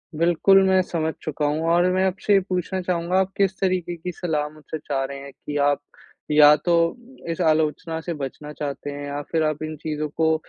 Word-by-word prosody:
बिल्कुल, 175 +4 +4
मैं 190 0 +4
समझ 160 -3 -2
चुका 150 -1 -2
हूँ 150 +2 0
और 170 +1 +4
मैं 185 - +2
आपसे 190 +2 0
ये 200 - +6
पूछना 185 +1 -1
चाहूँगा 180 0 0
आप 190 0 0
किस 190 -1 +1
तरीके 180 -2 0
की 175 +2 -5
सलाह 155 -4 -2
मुझसे 155 +1 -8
चाह 140 -2 -2
रहे 140 0 -6
हैं 140 - -9
कि 145 +2 -6
आप 145 0 +2 0.5
या 150 0 +8
तो 170 +3 +1 0.6
इस 165 - -3
आलोचना 160 0 +1
से 170 +1 -4
बचना 150 0 -6
चाहते 145 -1 -5
हैं 145 0 -6
या 145 +1 -4
फिर 160 -1 +2
आप 155 0 -1
इन 155 0 -4
चीज़ों 155 -1 -2
को 160 0 +3
160 Hz, 205 wpm, -23 LUFS, 150-180 Hz, 0.6 s, या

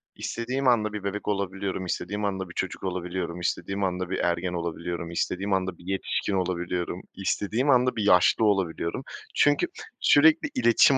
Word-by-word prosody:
istediğim 130 +3 -2
anda 110 -3 +3
bir 105 -2 -5
bebek 100 +1 -4
olabiliyorum, 95 -1 -2
istediğim 100 +4 -2
anda 95 -2 -2
bir - - -10
çocuk 95 - -3
olabiliyorum, 90 -1 -3
istediğim 100 +2 -2
anda 90 -1 -1
bir 95 - -1
ergen 90 +1 0
olabiliyorum, 85 0 -4
istediğim 95 +3 -1
anda 95 -2 -1
bir 85 - -16
yetişkin 95 +1 -1
olabiliyorum, 90 -1 -2
istediğim 105 +7 -1
anda 125 -1 +4
bir 110 - -1
yaşlı 100 +3 +5
olabiliyorum. 95 +2 0 0.3
Çünkü 145 0 +4 0.3
sürekli 160 +2 +5
iletişim 120 +3 +6
95 Hz, 155 wpm, -26 LUFS, 90-105 Hz, 0.3 s, iletişim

